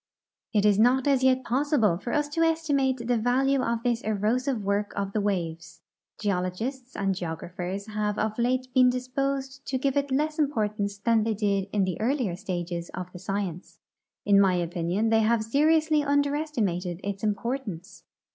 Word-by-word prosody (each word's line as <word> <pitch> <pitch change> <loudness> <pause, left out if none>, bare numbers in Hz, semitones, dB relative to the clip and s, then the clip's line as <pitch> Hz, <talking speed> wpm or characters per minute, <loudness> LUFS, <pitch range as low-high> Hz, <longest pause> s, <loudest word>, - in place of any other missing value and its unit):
It 210 -2 +2
is 205 -1 +4
not 250 +3 +4
as 275 -2 +3
yet 260 0 +3
possible 255 - +2
for 200 +7 -5
us 295 +2 +1
to 330 +3 -1
estimate 295 -5 +2
the 235 - -7 0.2
A'alue 265 +4 +2
of 230 0 -1
this 240 -1 +1
erosive 225 +5 0
Avork 205 0 -1
of 200 -1 -3
the 215 - +1
Avaves. 165 -5 -3 0.4
Geologists 215 +7 -3
and 195 -1 0
geographers 180 +2 -5
have 210 -1 -2
of 215 +1 -1
late 255 +2 +1
been 255 0 +6
disposed 270 +2 -2
to 265 - 0
give 270 +1 0
it 285 0 0
less 305 +4 0
importance 210 -8 0
than 225 +1 +2
they 220 0 0
did 200 -2 0
in 205 -2 +1
the 185 -1 -2
earlier 240 -6 0
stages 175 -3 -4
of 180 0 -6
the 180 - -8
science. 195 -2 -4 0.5
In 200 -1 +6
my 190 -2 +4
opinion 175 +4 -1
they 225 0 +4
have 220 0 +2
seri 295 +8 +3
ously 310 -1 +2
underestimated 280 - 0
its 200 0 -4
importance. 210 -4 -3
220 Hz, 170 wpm, -27 LUFS, 195-265 Hz, 0.5 s, been